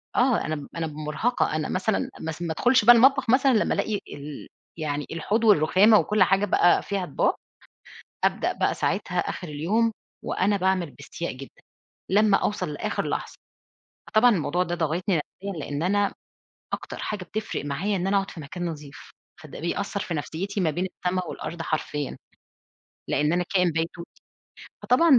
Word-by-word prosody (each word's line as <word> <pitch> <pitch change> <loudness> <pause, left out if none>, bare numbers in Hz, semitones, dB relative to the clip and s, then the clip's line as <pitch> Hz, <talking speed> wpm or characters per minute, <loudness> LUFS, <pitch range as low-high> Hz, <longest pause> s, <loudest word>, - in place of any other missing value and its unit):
آه، 250 -1 +3
أنا 155 - -1
بم 145 -2 -7
أنا 165 -1 -2
ب 150 - -8
مُرهقة، 155 +7 0
أنا 155 -1 -2
مثلًا 195 +3 0
أ - - -11
ما 160 - -3
س 155 - -9
ما 170 -2 -2
أدخُلش 245 +3 +3
بقى 240 0 +10
المطبخ 265 +1 +5
مثلًا 265 +2 +5
لمّا 215 - +2
ألاقي 215 - -1 0.2
ال 145 0 -8 0.3
يعني 145 -2 -2
الحوض 205 +8 -1
والرُخامة 205 +2 +6
وكل 210 -2 +3
حاجة 195 +2 +3
بقى 175 -2 +4
فيها 195 -2 -2
أطباق، 145 - +1 0.9
أبدأ - - +1
بقى - - +1
ساعتها - - -1
آخِر 180 - -3
اليوم 205 +11 +1 0.3
وأنا 200 +2 +1
باعمل 185 -4 0
باستياء 145 +4 -6
جدًا، 135 +1 -12 0.5
لمّا 205 +1 +5
أوصل 210 - -1
لآخِر - - -2
لحظة. - - -3 0.7
فطبعًا 230 +3 +5
الموضوع 180 -1 +1
ده 175 0 -3
ضاغطني 175 +3 0
نَفْسيًا 195 +6 -6
لإن 145 +2 -3
أنا 200 +2 +2 0.6
أكتر - - -5
حاجة 205 -4 -4
بتفرق 215 -4 -4
معايا 180 +9 -1
إن 180 +1 -1
أنا 200 - +2
أقعُد 195 0 0
في 165 - -9
مكان 175 +5 -6
نضيف، 150 -3 -8 0.3
فده 155 -3 -10
بيأثّر 200 +4 -2
في 175 - -3
نَفْسيّتي 190 +7 -3
ما 165 -3 +2
بين 180 +5 -2 0.2
السما 185 0 +1
والأرض 165 +1 -6
حرفيًا، 150 -3 -3 0.9
لإن 150 +2 +1
أنا 180 +1 +1
كائِن 180 -2 +4
بيتوتي، 165 +2 -4 0.6
فطبعًا 270 +1 +5
180 Hz, 170 wpm, -25 LUFS, 155-205 Hz, 0.9 s, بقى